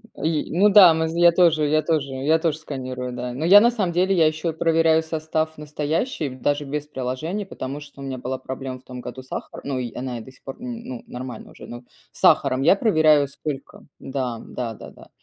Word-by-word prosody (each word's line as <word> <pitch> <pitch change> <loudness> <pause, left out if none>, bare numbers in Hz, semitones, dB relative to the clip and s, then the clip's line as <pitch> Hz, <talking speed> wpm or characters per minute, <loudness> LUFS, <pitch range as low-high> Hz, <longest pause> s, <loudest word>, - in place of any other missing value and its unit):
М, - - -9
и 160 -2 0
ну 205 +2 +6
да, 190 -5 +8
мы 160 0 0
з 165 +1 -5
я 175 0 +7
тоже 165 -4 +3
я 155 +1 +2
тоже 150 -4 -1
я 150 +5 +2
тоже 160 -2 0
сканирую, 130 -4 -6
да. 125 0 -5
Но 150 +6 -3
я, 200 +4 +9
на 240 +1 +4
самом 195 -7 -1
деле, 185 +2 +2
я 160 -2 +5
еще 155 +2 -2
и - - -3
проверяю 160 0 +3
состав 160 0 -2
настоящий, 150 - -2
даже 145 +3 -2
без 150 +1 -4
приложения, 150 +10 -4
потому 140 -5 -6
что 145 -1 -13
у - - -7
меня 135 -1 -4
была 130 +1 -4
проблема 130 -1 -6
в - - -26
том 125 -1 -9
году 130 - -8
с 130 - -19
сахаром. - - -7
Ну, 135 -2 -2
и 120 -2 -5
она 125 -2 -5
и - - -8
до 130 - -12
сих - - -24
пор, 135 - -7
м, 245 -1 -6
ну, 125 -2 -7
нормально 125 0 -8
уже, - - -12
ну, 120 +1 -9 0.3
сахаром 130 +1 +3
я 190 - +5
проверяю, 155 -9 +4
сколько, 140 0 -7
да, 130 -4 -4
да-да-да. 115 -3 -8
150 Hz, 225 wpm, -23 LUFS, 130-160 Hz, 0.3 s, я